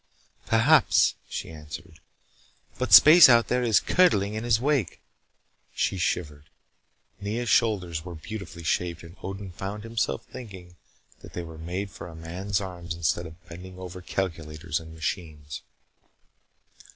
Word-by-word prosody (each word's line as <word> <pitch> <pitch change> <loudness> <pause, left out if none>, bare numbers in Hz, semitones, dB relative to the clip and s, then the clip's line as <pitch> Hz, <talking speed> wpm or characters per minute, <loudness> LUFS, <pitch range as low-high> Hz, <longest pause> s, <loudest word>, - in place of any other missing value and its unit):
"Perhaps," 125 +8 +4 0.2
she - - -5
answered. 80 +1 -10 0.8
"But - - -2
space 155 0 +10
out 115 -1 +5
there 125 0 +1
is 115 -4 +4
curdling 105 - +3
in 110 +1 -4
his 115 -2 +2
wake." 135 - 0 0.8
She 95 - 0
shivered. 75 -4 -2 0.7
Nea's 110 +4 -3
shoulders 90 -9 +1
were 90 -1 -8
beautifully 85 0 -8
shaped, 85 0 -1
and 85 +2 -12
Odin 95 0 -6
found 100 +4 -6
himself 105 - -2
thinking 95 -7 -11 0.4
that - - -13
they 85 - -4
were 80 -1 -10
made 90 +5 -4
for 85 - -9
a 85 - -11
man's 90 +5 -3
arms 85 -4 -6
instead 85 +1 -1
of 80 +2 -15
bending 90 +2 -10
over 90 0 -8
calculators 80 -4 -3
and 80 0 -12
machines. 80 -2 -5
90 Hz, 140 wpm, -26 LUFS, 80-105 Hz, 0.8 s, space